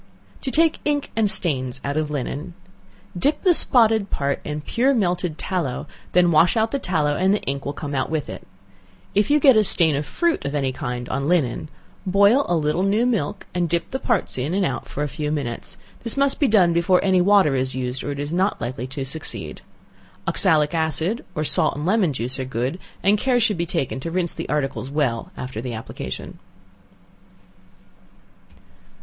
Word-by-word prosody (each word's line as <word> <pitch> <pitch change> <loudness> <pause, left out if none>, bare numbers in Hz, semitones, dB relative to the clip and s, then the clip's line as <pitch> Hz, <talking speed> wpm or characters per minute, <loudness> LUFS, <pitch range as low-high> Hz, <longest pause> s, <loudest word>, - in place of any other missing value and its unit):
To - - -3
Take 320 +3 +2
Ink 290 -1 -1
and 220 -2 +2
Stains 135 - -1
out 140 0 -2
of 155 -1 -1
Linen. 150 +4 -4 0.6
Dip 280 - 0
the 365 -3 +5
spotted 225 - +3
part 140 0 -1
in 150 0 -4
pure 260 - +1
melted 180 -6 0
tallow, 170 -10 -2 0.3
then 175 -1 +4
wash 170 +7 +4
out 220 0 +1
the 280 - -1
tallow 155 - 0
and 190 +5 +2
the - - -3
ink 140 0 -3
will 140 - -2
come 145 0 -6
out 130 -2 -1
with 155 -2 -2
it. - - -7 0.7
If 205 +5 +2
you 300 +1 +4
get 270 -3 +6
a 215 - +5
stain 165 -6 +3
of 145 +1 -3
fruit 340 -1 0
of 140 +1 -3
any 135 -2 0
kind 125 -2 -5
on 140 +1 -2
linen, 155 -4 0 0.3
boil 200 +8 +4
a 175 - +2
little 155 +2 0
new 205 +5 +2
milk, 220 -12 -1
and 175 -2 0
dip 170 +1 -1
the 265 - -3
parts 225 - 0
in 145 +8 -1
and 195 -1 +2
out - - -3
for 145 - -3
a - - -1
few 150 +1 -3
minutes; 145 +5 -3 0.2
this 230 +2 +1
must 275 0 +1
be 285 - +3
done 185 -7 +4
before 180 +2 +3
any 185 -2 +4
water 190 -6 +4
is 130 0 0
used, 130 0 -2
or - - -4
it 140 - -5
will 145 +4 -3
not 190 +3 +1
be - - -4
likely 125 0 -5
to 135 +1 -4
succeed. 145 +3 -6 0.7
Oxalic 150 0 +3
acid, 160 - -1
or 155 - -1
salt 150 - +3
and 145 +2 -4
lemon 190 -3 +2
juice 130 +1 -3
are - - -1
good, 130 +6 -3 0.2
and 200 +2 +4
care 250 0 +2
should 220 -3 +2
be 170 0 -2
taken 135 -3 -2
to 150 - -4
rinse 175 0 -1
the - - -6
articles 135 -3 -2
well 140 -6 -1
after 125 -3 -5
the 120 -2 -5
application. 65 - -7
165 Hz, 200 wpm, -22 LUFS, 140-200 Hz, 0.7 s, get